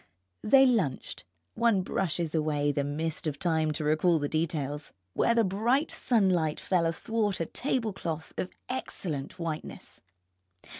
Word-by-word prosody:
They 270 +4 +7
lunched 205 - 0 0.3
(one 225 -5 +2
brushes 170 -3 -1
away 150 -2 +1
the 140 0 0
mist 155 +3 -3
of 145 -2 -2
time 160 -1 +1
to 155 +1 -3
recall 155 +3 +3
the 145 -2 -1
details) 150 -2 -2 0.2
where 235 - +2
the 230 - +4
bright 230 - +1
sunlight 185 -10 +2
fell 175 -3 +1
athwart 205 +4 -1
a 165 - 0
tablecloth 200 - -3
of 185 - -3 0.2
excellent 180 - -4
whiteness. 165 -3 -6
165 Hz, 135 wpm, -29 LUFS, 155-210 Hz, 0.3 s, They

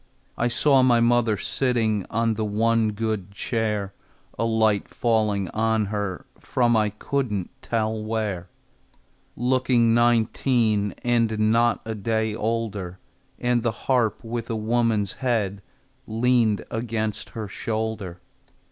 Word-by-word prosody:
I 120 - +1
saw 130 +4 +4
my 125 -2 +4
mother 115 -2 +3
sitting 110 -4 0
On 115 +1 +1
the 110 0 -2
one 110 +1 +2
good 110 -3 -2
chair, 105 -1 -2 0.4
A 115 - -1
light 110 -2 +2
falling 105 -4 +1
on 110 +1 +1
her 100 -3 -3
From 120 -2 +1
I 110 -1 +3
couldn't 105 -3 -2
tell 110 -1 -1
where, 105 -5 -3 0.9
Looking 125 -2 +2
nineteen, 115 -3 +2
And 110 -3 +2
not 120 +1 +2
a 110 - -3
day 110 +1 -1
older, 105 -5 -3 0.4
And 120 -1 +1
the 115 0 0
harp 125 -5 +1
with 115 0 -4
a 115 - -1
woman's 110 -2 +1
head 105 -6 0 0.5
Leaned 115 -2 +2
against 110 -2 -3
her 110 -2 -3
shoulder. 110 -4 -4
110 Hz, 120 wpm, -24 LUFS, 105-120 Hz, 0.9 s, saw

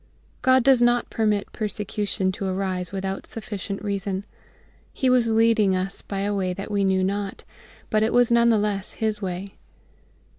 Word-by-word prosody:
GOD 260 -1 +4
does 265 -1 +5
not 240 0 +2
permit 210 -2 0
persecution 205 -3 -2
to 195 +1 -4
arise 185 -2 -2
without 195 0 -4
sufficient 200 -3 -6
reason.... 200 -1 -2 0.7
He 260 -1 +1
was 245 -2 +4
leading 225 -3 +3
us 185 +1 -3
by 195 -1 -4
a 205 +1 0
way 185 -2 -1
that 195 +3 -7
we 200 -1 +1
knew 190 -1 +2
not; 200 +1 -2 0.5
but 215 -2 +3
it 220 - +2
was 245 -1 +4
none 235 0 +5
the 225 - +4
less 205 -1 -2
His 220 -1 -2
way. 190 +1 -5
205 Hz, 170 wpm, -24 LUFS, 195-225 Hz, 0.7 s, does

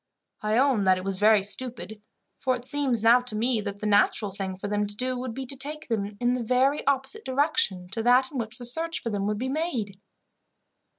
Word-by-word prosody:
I 215 +1 0
own 255 -6 +3
that 185 0 +4
it 185 - -6
was 195 -1 -3
very 210 -1 +5
stupid, 220 -2 -4 0.4
for 255 -1 +1
it 245 0 -7
seems 265 -5 +1
now 235 +2 +7
to 245 -3 -4
me 230 +1 +1
that 200 -1 -5
the - - -4
natural 205 0 +3
thing 190 -1 -4
for 190 +2 -6
them 205 0 -1
to 205 - -7
do, 255 +3 -1
would 250 -3 -5
be 265 - -5
to 275 - -4
take 300 +3 -3
them 205 -2 -2
in 245 0 +1
the 250 - -2
very 255 +5 +1
opposite 280 +10 0
direction 260 - +1
to 210 +4 -3
that 250 +3 +3
in 275 - -4
which 225 +1 -4
the 245 - -7
search 325 +7 -1
for 230 - -4
them 200 -1 -2
would 210 0 -1
be 255 +4 -3
made." 255 - -3
235 Hz, 230 wpm, -26 LUFS, 205-260 Hz, 0.4 s, now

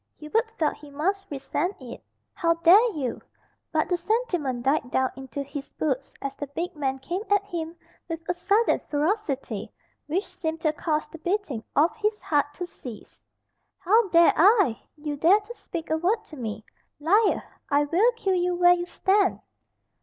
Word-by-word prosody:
Hubert 445 +10 0
felt 310 -2 +1
he 295 - -13
must 385 +8 -1
resent 300 +6 -2
it. 250 -3 -9 0.3
"How 335 0 +2
dare 375 +8 +6
you 260 -5 -3 0.2
" - - -43
But 315 -1 +1
the 355 0 +1
sentiment 345 - -1
died 270 -1 +1
down 260 0 +1
into 270 +1 -6
his 280 0 -8
boots 275 -3 -2
as 275 0 -3
the 290 - -5
big 335 +6 -4
man 270 -3 -1
came 345 +8 -4
at 405 -1 +3
him 335 -4 -5 0.3
with 330 -1 -3
a 355 - +1
sudden 405 +6 +2
ferocity 290 - -1 0.4
which 360 +7 -1
seemed 320 -1 -4
to 310 -2 +2
cause 305 0 -1
the 330 - -11
beating 345 - -2
of 315 +4 +3
his 425 0 0
heart 290 -1 +1
to 360 - -4
cease. 250 -9 -11 0.6
"How 410 +3 +3
dare 340 -1 +6
I! 385 - +4 0.2
You 295 -1 -4
dare 350 +8 +5
to 430 +3 -11
speak 335 -7 -6
a 315 - +3
word 405 +7 +1
to 310 - -10
me. 220 -4 -5 0.3
Liar! 400 +8 +3 0.3
I 285 +1 +3
will 360 +11 +3
kill 395 -5 -1
you 360 0 +1
where 355 0 +6
you 350 0 -2
stand." 390 +1 +2
330 Hz, 175 wpm, -26 LUFS, 285-390 Hz, 0.6 s, dare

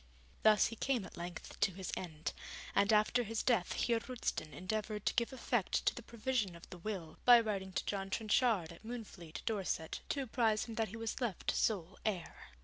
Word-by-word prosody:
Thus 215 -1 +6
he 230 - -2
came 245 -3 0
at - - -11
length 175 -1 -7
to 200 - +3
his 190 +1 -5
end, 160 -3 -4 0.4
and 200 +2 +4
after 215 +3 +4
his 225 -1 -2
death 230 -8 +2
Heer 235 -1 +2
Roosten 225 -9 -3
endeavoured 210 +4 -3
to - - +3
give 235 +1 +1
effect 240 -5 0
to - - +4
the - - -7
provision 235 -5 -1
of 170 - -12
the 180 - -8
will, 175 -5 -5
by 245 -1 +9
writing 200 -4 -2
to - - -1
John 195 -1 -2
Trenchard, 215 -4 +2
at 170 - -15
Moonfleet, 215 -8 -7
Dorset, 195 -7 -1
to 280 - 0
apprise 225 -3 +2
him 230 - -7
that 225 0 0
he 225 - -7
was 225 +3 -3
left 230 -8 0
sole 190 -4 0
heir. 190 -6 -3
215 Hz, 195 wpm, -36 LUFS, 185-230 Hz, 0.4 s, by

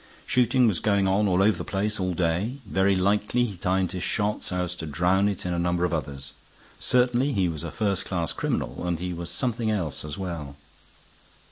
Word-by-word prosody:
Shooting 125 0 +3
was 100 -6 +1
going 100 -2 +2
on 100 +2 +3
all 95 0 +3
over 105 +1 +3
the - - -2
place 105 +2 -2
all 90 -1 -1
day; 90 +9 0
very 95 0 +2
likely 105 +6 +2
he 105 -5 -5
timed 90 0 0
his 90 -1 -4
shot 105 +3 0
so 90 -1 -2
as 90 0 -3
to 80 -3 -7
drown 90 +6 +2
it 100 -3 -4
in 90 - -1
a 85 - -1
number 90 0 +1
of 85 - -1
others. 70 -3 -4 0.5
Certainly 125 +2 +2
he 95 -3 +2
was 80 -2 -4
a 85 - -4
first 100 +1 -1
class 85 -5 -1
criminal. 90 - -2
And 85 -1 0
he 90 +2 -4
was 85 0 -5
something 115 +5 -1
else 90 -10 -2
as 75 -1 -6
well." 85 -7 -5
95 Hz, 210 wpm, -26 LUFS, 85-105 Hz, 0.5 s, Shooting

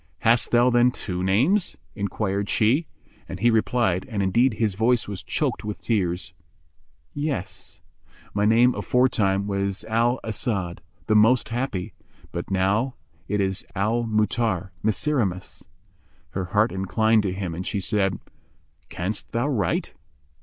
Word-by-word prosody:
"Hast 115 +2 +3
thou 120 +1 +4
then 120 0 +5
two 90 -7 -4
names?" 135 - +2 0.2
enquired 100 0 -2
she, 130 +9 +2 0.4
and - - -6
he 120 - +4
replied 110 -4 +1
(and 105 -4 -1
indeed 115 +5 +3
his 110 -3 0
voice 115 +4 +2
was 100 -2 -5
choked - - -2
with 105 -1 -5
tears), 95 -6 -1 0.8
"Yes; 145 - -4 0.5
my 105 - 0
name 115 +4 +5
aforetime 105 -6 +1
was 100 0 -2
Al 115 +3 +1
As'ad, 100 -5 -2 0.3
the 110 - +1
most 115 +4 +4
happy, 115 -6 -3 0.4
but 85 - -5
now 100 +7 +1 0.3
it 105 +1 -1
is 95 -1 -1
Al 110 +5 +1
Mu'tarr—Miserrimus." 105 - -1 0.6
Her 95 -1 -3
heart 105 +5 +2
inclined 110 +4 +2
to 100 -3 -1
him 95 -2 -4
and 90 +3 -5
she 100 - -1
said, 95 -1 0 0.7
"Canst 95 +5 -4
thou 120 +4 +1
write?" 105 - 0
105 Hz, 130 wpm, -24 LUFS, 95-120 Hz, 0.8 s, then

